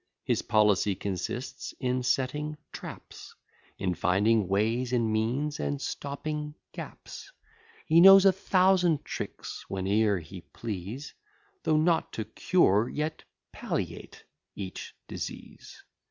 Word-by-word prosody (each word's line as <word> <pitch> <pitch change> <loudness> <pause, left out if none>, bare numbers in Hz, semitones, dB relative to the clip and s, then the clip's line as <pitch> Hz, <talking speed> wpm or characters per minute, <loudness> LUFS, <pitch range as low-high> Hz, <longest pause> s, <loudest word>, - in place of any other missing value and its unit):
His - - +1
policy 105 -3 +3
consists 100 +7 -4
in 125 0 0
setting 150 +4 -1
traps, - - -10 0.4
In 90 -2 -1
finding 100 +4 +2
ways 110 +6 +1
and 115 -3 +1
means, 130 +8 -1
and 145 - -2
stopping 150 +2 -4 0.2
gaps; - - -9 0.5
He 165 +1 +5
knows 195 +1 +9
a 195 - +8
thousand 185 -4 +3
tricks - - -6
whene'er 100 +2 +1
he 90 +2 -9
please, 110 +5 -6 0.5
Though 155 - +2
not 160 +1 +2
to 110 - -3
cure, 110 - +2
yet 155 +1 -3 0.3
palliate - - -5 0.3
each 95 -2 -7
disease. - - -8
125 Hz, 110 wpm, -28 LUFS, 105-150 Hz, 0.5 s, knows